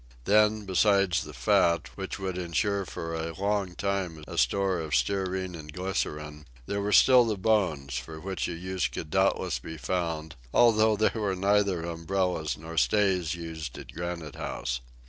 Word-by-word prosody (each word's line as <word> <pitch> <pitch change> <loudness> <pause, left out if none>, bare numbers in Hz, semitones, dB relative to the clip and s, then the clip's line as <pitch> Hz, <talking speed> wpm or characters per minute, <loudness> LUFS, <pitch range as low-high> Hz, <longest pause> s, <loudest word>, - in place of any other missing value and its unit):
Then, 105 +2 +3
besides 100 -1 +3
the - - -9
fat, 80 +6 +2
which 95 -1 -5
would 95 -2 -3
insure 95 +3 -1
for 80 0 -5
a 80 0 -3
long 100 -2 0
time 95 -5 -2
a - - -7
store 95 +9 +2
of 80 -2 -1
stearine 95 -2 0
and 75 -3 -8
glycerine, 75 -4 -4 0.2
there 100 +7 -2
were 105 +1 -1
still 125 +4 +7
the 110 -3 -1
bones, 85 - +1
for 80 +6 -9
which 95 +3 -3
a 90 - -4
use 90 +2 -2
could 75 - -7
doubtless 95 +2 +1
be 80 - -8
found, 80 -3 -3 0.2
although 110 -2 +5
there 110 - +3
were 105 -4 -1
neither 100 -2 +2
umbrellas 85 -1 -1
nor 80 +1 -9
stays 95 -5 +2
used 80 -4 -6
at - - -9
Granite 85 -2 -5
House. - - -3
90 Hz, 165 wpm, -28 LUFS, 80-100 Hz, 0.2 s, still